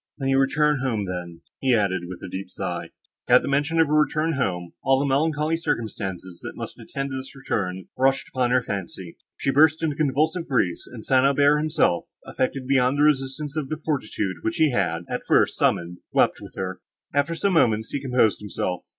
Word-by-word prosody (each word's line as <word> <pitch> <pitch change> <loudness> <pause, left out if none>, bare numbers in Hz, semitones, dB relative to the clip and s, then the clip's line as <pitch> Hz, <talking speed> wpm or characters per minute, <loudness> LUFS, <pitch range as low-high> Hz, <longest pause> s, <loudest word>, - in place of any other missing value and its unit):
"When 135 -2 -2
you 135 0 +3
return 150 +2 +2
home, 115 -6 -1
then," 90 -2 -6 0.2
he 130 -2 +3
added 95 -5 0
with 90 0 -8
a - - -5
deep 95 +2 -6
sigh— - - -4 0.4
At - - +6
the - - -4
mention 145 +4 +1
of 160 - +6
her 150 - -2
return 155 +1 +2
home, 90 - -2
all 135 0 +4
the 140 - 0
melancholy 150 +3 +1
circumstances, 100 - -4
that - - -7
must - - -7
attend 140 0 -5
this 130 0 -6
return, 95 -8 -3
rushed 135 +1 +1
upon 125 -2 0
her 125 0 +3
fancy; 95 -4 -6 0.2
she 135 - 0
burst 155 +3 +4
into 150 -3 0
convulsive 155 +4 0
grief, 95 -10 +1
and 115 -3 -9
St. 130 -1 +4
Aubert 145 +2 +4
himself, 155 - +1 0.2
affected 130 0 -2
beyond 130 0 +2
the 145 - +3
resistance 145 0 0
of 150 -4 -3
the 155 - -2
fortitude 110 - -2
which 110 - -2
he 155 -3 +3
had, 90 -7 0
at - - -4
first, - - +3
summoned, 85 +1 0
wept - - +2
with - - -11
her. 95 0 -4 0.3
After 145 +4 +1
some 195 +3 +1
moments, 110 -9 +2
he 140 - -2
composed 125 -5 +2
himself. 90 -3 -4
135 Hz, 195 wpm, -24 LUFS, 100-150 Hz, 0.4 s, At